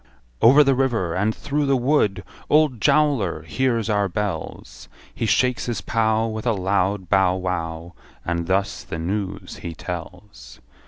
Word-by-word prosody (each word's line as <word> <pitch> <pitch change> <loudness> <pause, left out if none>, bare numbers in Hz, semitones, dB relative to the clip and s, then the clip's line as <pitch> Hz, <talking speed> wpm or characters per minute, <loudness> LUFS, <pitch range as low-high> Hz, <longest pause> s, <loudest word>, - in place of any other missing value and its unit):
Over 140 +6 +7
the 135 -1 +3
river, 120 -10 0
and 105 +4 0
through 145 0 -2
the 135 -1 +3
wood 120 -7 +1 0.3
Old 150 -7 +3
Jowler 140 - +2
hears 115 +5 0
our 105 -2 +1
bells; 90 - -5 0.2
He 115 - -2
shakes 125 +2 +1
his 120 - -2
pow, 110 0 +1
With 110 +1 -4
a 115 - +3
loud 95 0 0
bow 95 -1 +3
wow, 85 -2 -4 0.3
And 85 0 -2
thus 95 0 -1
the - - -6
news 95 +4 -4
he 85 -1 -7
tells. 90 -7 -9
105 Hz, 150 wpm, -22 LUFS, 90-120 Hz, 0.3 s, Over